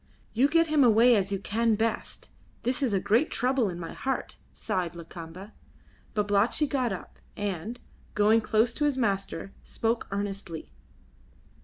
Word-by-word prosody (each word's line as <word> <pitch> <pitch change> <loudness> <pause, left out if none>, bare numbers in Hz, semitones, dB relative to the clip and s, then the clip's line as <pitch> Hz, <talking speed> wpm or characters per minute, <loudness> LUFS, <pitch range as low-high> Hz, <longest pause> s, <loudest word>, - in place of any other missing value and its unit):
"You 250 +5 +4
get 330 +2 +4
him 305 -3 +3
away 235 +1 +6
as 195 -2 0
you 195 - 0
can 220 +3 +1
best. 220 +1 -2 0.3
This 250 +4 0
is 260 -5 +1
a 195 - +2
great 230 +10 +2
trouble 250 -2 +1
in 175 -1 -6
my 165 - -6
heart," 265 0 -3
sighed 175 -2 -2
Lakamba. 170 +3 -9 0.6
Babalatchi 210 +7 +2
got 260 -5 0
up, 190 - -7 0.2
and, 205 +3 -3 0.4
going 215 +2 +4
close 220 +2 +2
to 295 - 0
his 285 -3 +1
master, 195 -4 -1
spoke 230 +1 -2
earnestly. 200 -4 -4
215 Hz, 150 wpm, -28 LUFS, 195-245 Hz, 0.6 s, away